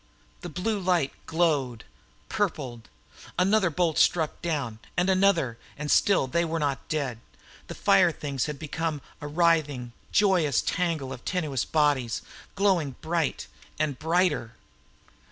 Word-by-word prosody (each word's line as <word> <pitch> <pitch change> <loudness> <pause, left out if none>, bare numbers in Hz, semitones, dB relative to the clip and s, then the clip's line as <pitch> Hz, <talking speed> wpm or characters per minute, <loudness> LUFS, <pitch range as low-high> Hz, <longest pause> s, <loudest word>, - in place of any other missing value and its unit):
The - - -7
blue 205 +4 -1
light 175 -7 +1 0.2
glowed, 145 -8 0 0.4
purpled. 135 - -3 0.5
Another 190 +1 +3
bolt 165 0 +1
struck 160 -3 +2
down, 140 -10 -2 0.2
and 180 +2 +3
another, 185 -11 +2 0.2
and 150 0 -2
still 200 -8 +4
they 170 +7 0
were 165 0 -2
not 145 -3 -2
dead. 135 -7 -2 0.5
The - - -7
fire 195 -4 +4
things 140 -4 -3
had 150 -1 -4
become 155 0 -3 0.2
a 145 - -5
writhing, 150 -6 +1 0.2
joyous 180 - +3
tangle 165 -7 -1
of 125 - -10
tenuous 155 -9 -1
bodies, 145 -7 +1 0.3
glowing 185 -9 +2
bright 165 -1 -1 0.3
and 150 -4 -1
brighter. 160 -8 +1
155 Hz, 130 wpm, -27 LUFS, 140-180 Hz, 0.5 s, still